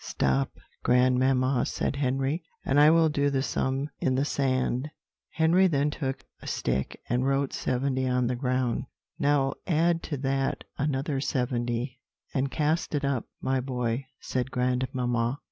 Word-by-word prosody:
"Stop, 65 +1 +1 0.3
grandmamma," 130 +1 +3
said 140 - -2
Henry, 135 +4 0 0.2
"and 140 +2 +3
I 150 +1 +8
will 165 0 +5
do 145 -2 +1
the 135 -1 0
sum 135 +1 -1
in 130 - +1
the 135 +2 +1
sand." 130 -1 0 0.4
Henry 170 +4 +4
then 145 -3 +1
took 135 -3 -4 0.2
a - - -10
stick 65 +1 -2
and 125 +1 +1
wrote 135 0 +1
70 130 +1 0
on 125 -1 +2
the 125 +1 0
ground. 125 -1 0 0.3
"Now 140 -1 +2
add 170 0 +2
to 145 - -4
that 135 0 -1
another 140 0 -1
seventy, 125 -2 -1 0.3
and 135 +1 0
cast 155 +2 0
it 145 -1 0
up, 135 -4 0 0.2
my 130 0 +1
boy," 125 0 -2
said 130 0 -2
grandmamma. 125 -1 0
135 Hz, 145 wpm, -27 LUFS, 125-145 Hz, 0.4 s, I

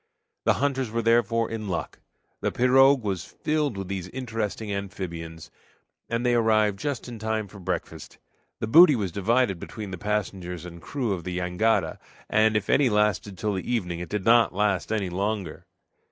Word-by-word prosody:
The - - +4
hunters 135 -2 0
were 115 +1 -2
therefore 115 0 +2
in 110 -2 -4
luck. 90 -3 -4 0.4
The - - -1
pirogue 135 +1 +5
was 95 -4 -2
filled 150 -7 -2
with 95 -1 -5
these 95 -2 -4
interesting 115 -3 -4
amphibians, 85 -5 -6 0.6
and 115 +1 -1
they 120 - +3
arrived 110 -3 +3
just 140 -1 -3
in 120 -2 -8
time 110 -1 -2
for 100 +1 -13
breakfast. 90 - -5 0.4
The - - -1
booty 155 +6 +8
was 100 -6 -2
divided 100 0 +1
between 105 +1 -7
the 90 - -6
passengers 95 -4 -3
and 85 -1 -10
crew 125 -3 -2
of 90 -3 -5
the 90 0 -4
jangada, 90 0 0 0.3
and 110 0 +4
if 100 - -3
any 140 -3 +4
lasted 105 -2 +1
till 105 +1 -1
the 95 +5 -3
evening 90 -8 -1
it 90 - -6
did 105 -2 -3
not 115 -4 +5
last 105 -1 0
any 100 -5 -1
longer. 100 -2 -3
105 Hz, 175 wpm, -26 LUFS, 95-115 Hz, 0.6 s, booty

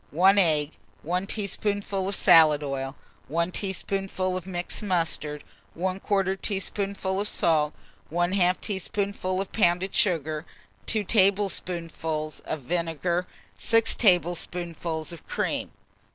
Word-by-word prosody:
1 190 +6 +5
egg, 155 -5 +3 0.4
1 180 +3 0
teaspoonful 200 -1 -2
of 200 - 0
salad 155 -4 +6
oil, 135 -1 -3 0.3
1 170 +4 0
teaspoonful 190 -1 -2
of 185 0 -5
mixed 175 -1 -3
mustard, 165 -6 -1 0.3
1/4 190 +1 0
teaspoonful 195 -1 -2
of 210 - -1
salt, 155 -6 +2 0.4
1/2 175 +2 +2
teaspoonful 195 -1 -2
of 195 - -4
pounded 185 -2 +2
sugar, 155 -5 +1 0.4
2 215 -2 +1
tablespoonfuls 175 -6 0
of 155 - -4
vinegar, 170 +4 -1 0.3
6 230 -1 +4
tablespoonfuls 175 -4 +1
of 170 - -11
cream. - - -2
180 Hz, 110 wpm, -26 LUFS, 165-195 Hz, 0.4 s, salad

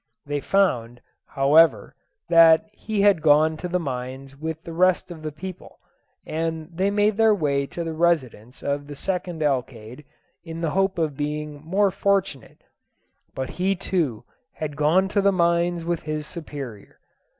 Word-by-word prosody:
They 145 0 -2
found, 120 -11 0 0.3
however, 140 -4 +3 0.3
that 165 -1 +6
he 210 -1 -3
had 200 -5 +4
gone 155 +1 +4
to 180 - -5
the 180 +1 -1
mines 130 -2 -6
with 160 +2 -5
the 165 - -8
rest 180 +1 +2
of 165 -2 -9
the 155 0 -5
people, 185 +4 -9 0.5
and 160 +1 -4
they 190 +3 +1
made 205 +1 +1
their 220 -1 +5
way 140 -6 0
to 170 - -5
the 165 -1 -4
residence 130 -8 -1
of 140 0 -2
the 145 - -8
second 175 -1 -3
alcalde, 125 -2 -3 0.4
in 165 -1 -7
the 165 -3 -1
hope 195 +1 +1
of 155 -4 -1
being 150 0 -4
more 195 +4 +2
fortunate; 195 - -1 0.7
but 130 0 -4
he 195 +1 +2
too 165 - -2 0.3
had 150 -2 -5
gone 165 +6 +3
to 200 0 +1
the 200 0 +4
mines 170 -1 +1
with 170 -1 -1
his 155 -1 -4
superior. 140 - -9
160 Hz, 160 wpm, -23 LUFS, 145-180 Hz, 0.7 s, that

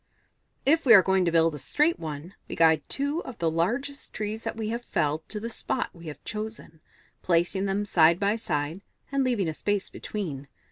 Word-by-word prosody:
"If 320 +4 +4
we 235 -4 +8
are 190 - +8
going 190 -1 +2
to 170 - +2
build 165 -1 +3
a 150 - -6
straight 300 - +1
one, 155 +2 -6 0.2
we - - -4
guide 160 -1 +5
two 285 +4 0
of 255 - -9
the 165 -1 0
largest 245 - -1
trees 215 +1 -3
that - - -3
we 220 -1 -3
have 235 +2 -3
felled 155 -6 -1
to 210 - -4
the 225 - -4
spot 245 +2 -3
we 170 -2 -12
have 150 - -8
chosen, 215 -7 -6 0.4
placing 175 +3 +1
them 200 +1 0
side 170 -3 +4
by 200 +1 +2
side, 160 -4 -3 0.3
and 275 -1 +1
leaving 235 -8 +1
a 160 - -2
space 205 +4 -2
between. 150 -10 -5
195 Hz, 200 wpm, -27 LUFS, 165-225 Hz, 0.4 s, we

